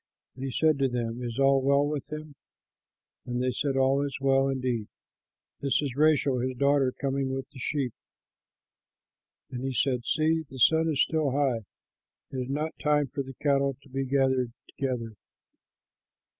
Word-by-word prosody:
And 130 - -8
he 135 - -2
said 155 +3 +2
to 135 - +3
them, 120 -1 -3
"Is 120 -2 -4
all 135 0 +4
well 140 +1 +3
with 145 -1 -4
him?" 155 -1 -6 0.9
And 120 0 -2
they 125 0 +1
said, 135 +2 -1
"All 135 +1 +3
is 140 -1 -3
well; 135 0 +3
indeed, 125 -5 -1 0.7
this 140 -1 +1
is 140 -5 -2
Rachel 145 -3 +3
his 130 +1 -2
daughter 140 -1 +3
coming 135 0 -2
with 135 0 -5
the 135 - -12
sheep." 135 -3 -1 1.6
And 125 -1 -5
he 135 0 -2
said, 125 0 0
"See, 160 +3 +2
the 135 - -10
sun 160 +5 +4
is 145 -3 +3
still 155 -3 0
high! 130 -6 +1 0.7
It 135 - -5
is 125 0 -3
not 150 +3 -3
time 150 -2 +2
for 140 +2 -3
the 135 -1 -8
cattle 140 -2 +2
to 145 - -18
be 135 +1 -2
gathered 130 -2 +1 0.2
together. 125 -4 -3
135 Hz, 170 wpm, -28 LUFS, 130-145 Hz, 1.6 s, all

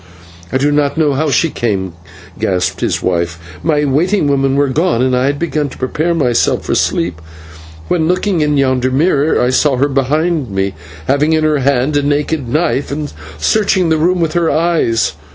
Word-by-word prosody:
"I - - +1
do 145 +2 +1
not 145 0 0
know 150 -3 +2
how 150 +3 0
she 150 +4 +1
came," 95 -6 -2 0.5
gasped 90 -1 -1
his - - -1
wife. 85 -2 -1 0.2
"My 150 -2 +1
waiting 165 +7 +1
women 135 -1 +1
were 140 0 +2
gone, 140 -2 +1
and 130 -1 +1
I 125 +1 +1
had 145 +1 0
begun 155 -2 -2
to - - -12
prepare 155 +6 -1
myself 125 -7 +1
for - - -1
sleep, 85 -1 -1 0.7
when, 160 -2 +1
looking 180 0 0
into 150 -2 +2
yonder 130 -1 +1
mirror, 150 +2 +2
I 125 +1 +2
saw 135 +1 +2
her 135 +3 +1
behind 145 +1 0
me, 95 0 -2 0.3
having 145 +4 +2
in 155 0 +1
her 155 -1 +2
hand 135 +2 +1
a - - +2
naked 145 -1 -1
knife, 150 -1 0
and 145 0 -4 0.2
searching 195 -5 +1
the 160 - +2
room 175 +3 +1
with 165 -2 0
her 170 -2 +1
eyes. 160 -9 +1
145 Hz, 190 wpm, -14 LUFS, 130-160 Hz, 0.7 s, know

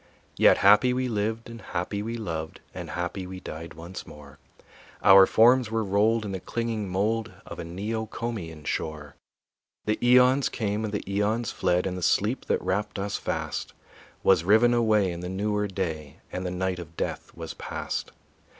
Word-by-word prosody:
Yet - - +6
happy 105 +6 +6
we 130 0 0
lived 110 0 -2
and 115 -1 -9
happy 95 +3 -3
we 115 +2 -4
loved, 80 -7 -5
And - - -7
happy 90 +2 -4
we 95 0 -7
died 80 -2 -8
once 85 +3 -8
more; 70 -2 -13 0.6
Our 95 -1 +9
forms 120 +1 +5
were 115 0 0
rolled 105 +3 +2
in 100 - -4
the 95 - -3
clinging 115 -1 -3
mold 105 +3 0
Of - - -9
a - - -4
Neocomian 105 -2 -4
shore. 75 -2 -3 0.7
The 105 0 0
eons 125 +2 +5
came 105 -2 -2
and 110 - -2
the 105 - -4
eons 105 +3 0
fled 90 0 +1
And 95 -1 -2
the 90 - -5
sleep 105 +8 +1
that - - +1
wrapped 105 +3 -1
us 100 +1 -2
fast - - -3 0.5
Was 90 -4 +5
riven 110 +6 +5
away 110 -5 +3
in 85 - -6
the 90 +1 -5
newer 105 +2 -1
day 80 -7 -4
And 90 0 -3
the - - -1
night 90 0 -2
of 85 -1 -10
death - - -3
was - - -6
past. - - -4
100 Hz, 175 wpm, -26 LUFS, 90-110 Hz, 0.7 s, Our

